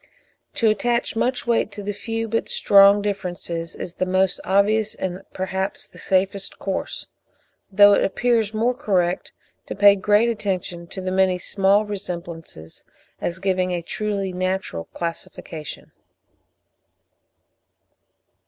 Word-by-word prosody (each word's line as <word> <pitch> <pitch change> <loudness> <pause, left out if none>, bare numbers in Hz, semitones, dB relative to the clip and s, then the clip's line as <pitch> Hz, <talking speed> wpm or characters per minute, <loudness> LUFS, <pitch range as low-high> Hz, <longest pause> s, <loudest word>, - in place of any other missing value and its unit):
To 230 - +2
attach 235 +3 +1
much 245 +2 0
weight 230 -2 +1
to 205 - -7
the 205 +1 -3
few 225 +2 -3
but 225 +1 -1
strong 200 0 +6
differences 175 -4 -4
is 175 - -6
the 185 - -1
most 185 0 +1
obvious 210 +2 +2
and 185 0 -4
perhaps 190 +1 -3
the - - -17
safest 195 +1 0
course, 195 - -4 0.7
though 205 +1 +7
it - - +3
appears 225 +1 +1
more 225 +3 +1
correct 190 -9 0 0.4
to - - -5
pay 200 0 +7
great 205 +3 +3
attention 185 -6 -3
to 190 - -7
the 185 0 -3
many 190 -1 +3
small 195 +3 +2
resemblances, 170 - -7 0.4
as 170 - -3
giving 185 -1 0
a 175 -1 -2
truly 200 0 -2
natural 185 - -2
classification. 165 - -7
195 Hz, 125 wpm, -22 LUFS, 185-210 Hz, 0.7 s, though